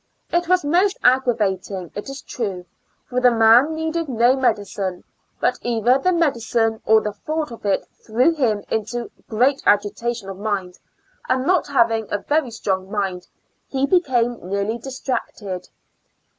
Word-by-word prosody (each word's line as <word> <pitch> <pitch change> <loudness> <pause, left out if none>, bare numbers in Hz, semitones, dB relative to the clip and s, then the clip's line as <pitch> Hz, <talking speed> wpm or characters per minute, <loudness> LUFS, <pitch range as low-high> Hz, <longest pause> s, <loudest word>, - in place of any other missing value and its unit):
It 345 0 +1
was 365 -3 +2
most 365 +6 +2
aggravating 205 -8 +1
it 205 - -6
is 275 0 -8
true, 195 -7 -4 0.4
for 250 0 -1
the 250 - +7
man 235 +6 +5
needed 320 0 -2
no 240 +1 +3
medicine, 205 -7 -1 0.4
but - - +1
either 240 +2 +2
the 365 +6 +2
medicine 235 -9 +1
or 220 0 +6
the 210 -1 -3
thought 305 +7 -3
of 230 -3 -7
it 195 - +1 0.2
threw 245 +9 +2
him 225 -9 0
into 225 +2 -2 0.2
great 255 +5 +2
agitation 210 +2 +1
of 195 -1 -7
mind, 195 -4 -3 0.5
and 255 0 +1
not 365 +1 +2
having 230 -6 +2
a 205 - +1
very 290 +4 0
strong 190 -4 -2
mind 195 -3 -3 0.4
he 270 0 0
became 250 -9 +1
nearly 200 +5 -2
distracted. 230 -7 -5
235 Hz, 145 wpm, -21 LUFS, 205-270 Hz, 0.5 s, the